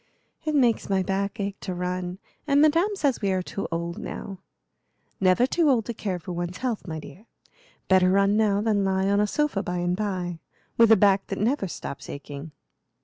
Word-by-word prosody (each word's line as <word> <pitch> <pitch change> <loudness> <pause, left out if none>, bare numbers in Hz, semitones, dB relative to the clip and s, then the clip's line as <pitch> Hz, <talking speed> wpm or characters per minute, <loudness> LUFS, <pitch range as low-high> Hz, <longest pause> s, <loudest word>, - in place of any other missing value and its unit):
"It 310 -1 0
makes 245 -7 +2
my 190 -1 +2
back 200 +3 -2
ache 200 0 -3
to 185 - -5
run, 180 0 -3 0.3
and 280 0 +4
Madame 330 +7 +3
says 285 -9 0
we 200 -2 +1
are 185 -1 0
too 195 - -4
old 170 +1 -3
now." 195 -3 -7 0.8
"Never 185 +5 +4
too 310 +3 +2
old 235 -5 +2
to 235 - -4
care 200 -4 -3
for 175 +1 -8
one's 175 +1 -4
health, 240 -6 -3
my 160 -1 -4
dear. 180 +9 -13 0.6
Better 185 -1 +5
run 200 +2 +3
now 210 -2 +2
than 210 -2 +1
lie 190 0 +1
on 200 +1 +3
a 210 - +2
sofa 295 -4 0
by 180 -1 -3
and 175 0 0
by, 185 -4 -3 0.4
with 230 -1 +5
a - - +10
back 195 0 +3
that 195 - -4
never 220 0 +1
stops 140 - -7
aching." 145 +2 -8
195 Hz, 200 wpm, -25 LUFS, 180-225 Hz, 0.8 s, a